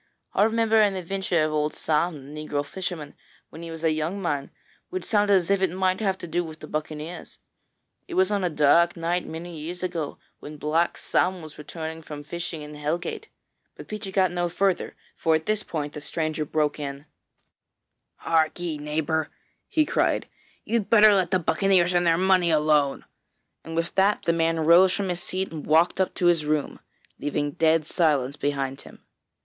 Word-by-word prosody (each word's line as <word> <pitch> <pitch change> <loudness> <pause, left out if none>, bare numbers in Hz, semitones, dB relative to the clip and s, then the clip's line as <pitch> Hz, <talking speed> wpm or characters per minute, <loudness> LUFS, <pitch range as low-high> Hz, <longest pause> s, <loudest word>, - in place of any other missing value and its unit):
I - - +2
remember 225 0 +3
an 205 -2 +3
adventure 185 -2 0
of 155 - 0
old 150 0 -1
Sam, 150 -3 -1
the 155 0 -6
negro 145 -1 -1
fisherman, 170 -4 -5 0.4
when 160 - -10
he 170 - -7
was 165 0 -7
a 160 - +3
young 155 +5 -2
man, 145 -7 -2 0.4
which 370 0 -4
sounded 205 -2 +3
as 185 0 +1
if 200 -1 +2
it 190 - +3
might 185 +1 0
have 195 -3 0
to 175 - -8
do 175 +2 0
with 160 -1 -9
the - - -8
buccaneers. 155 +2 -6 0.7
It - - -6
was 190 +2 +3
on 200 -2 0
a 180 - +1
dark 170 +3 +4
night 170 +2 -1
many 165 0 -7
years 175 +4 -6
ago, 170 -5 -3 0.2
when 150 +1 -9
Black 160 +4 0
Sam 180 -2 0
was 155 -1 -11
returning 160 +1 -6
from 150 -2 -8
fishing 165 0 -5
in 150 0 -9
Hellgate 160 - -3 0.2
' - - -50
but - - -11
Peechy 210 -2 -5
got 185 -2 +2
no 175 0 -1
further, 190 +2 0 0.2
for 160 -1 +2
at 160 - -2
this 215 0 0
point 150 -6 -4
the 150 - -7
stranger 155 0 -2
broke 150 0 0
in: 140 0 -6 1.2
'Hark'ee, 160 0 0
neighbour,' 155 +1 -1 0.4
he 310 -1 +2
cried; - - +1 0.4
'you'd 230 -3 -1
better 215 -2 +7
let 185 -3 +2
the 185 - +3
buccaneers 180 +1 +2
and 175 -1 +2
their 165 0 +4
money 185 -1 +3
alone,' 150 -3 +2 0.6
and 165 - -7
with 165 +1 -1
that 195 +2 +2
the 170 - +2
man 165 -1 +1
rose 170 +4 +6
from 200 -2 -2
his 175 -1 -2
seat 185 +1 -3
and 155 -2 -7
walked 165 +4 +3
up 190 - -1
to 180 - -1
his 170 -3 +4
room, 150 -1 -1 0.4
leaving 145 0 -1
dead 160 +1 +2
silence 145 -6 +1
behind 140 -2 -2
him. - - -15
165 Hz, 190 wpm, -25 LUFS, 155-185 Hz, 1.2 s, better